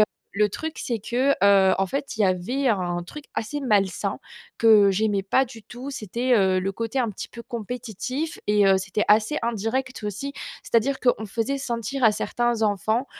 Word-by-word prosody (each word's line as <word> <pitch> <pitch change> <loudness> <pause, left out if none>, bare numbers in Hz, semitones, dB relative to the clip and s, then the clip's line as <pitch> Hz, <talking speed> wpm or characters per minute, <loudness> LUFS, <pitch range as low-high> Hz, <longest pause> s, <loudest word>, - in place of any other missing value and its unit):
heu, 215 - +8 0.3
le 210 0 +3
truc 320 +9 -5
c'est 235 -3 -2
que, 250 +6 0
heu, 195 -1 +6
en 195 - +2
fait, 275 +5 -4
il 220 - +1
y - - +5
avait 195 +9 0
un 175 -4 0
truc 300 +10 -10
assez 260 +7 -3
malsain 205 -8 0 0.4
que 215 -3 +6
j'aimais 205 0 +1
pas 260 +7 +3
du 230 -3 -12
tout, 255 +3 -8
c'était, 245 +1 -1
heu, 190 -2 +3
le 195 +1 -2
côté 230 +5 -3
un 240 - 0
petit 200 - -7
peu 235 - -10
compétitif 245 - -5
et, 210 -1 +4
heu, 190 - +5
c'était 190 +2 -1
assez 215 +7 +4
indirect 235 +3 -2
aussi. 210 +8 -4 0.3
C'est - - -13
à - - +7
dire 270 +4 -2
qu'on 245 -3 +1
faisait 230 +7 -2
sentir 255 0 -3
à 225 - +7
certains 240 +1 -1
enfants 215 +5 +1
225 Hz, 195 wpm, -24 LUFS, 200-255 Hz, 0.4 s, heu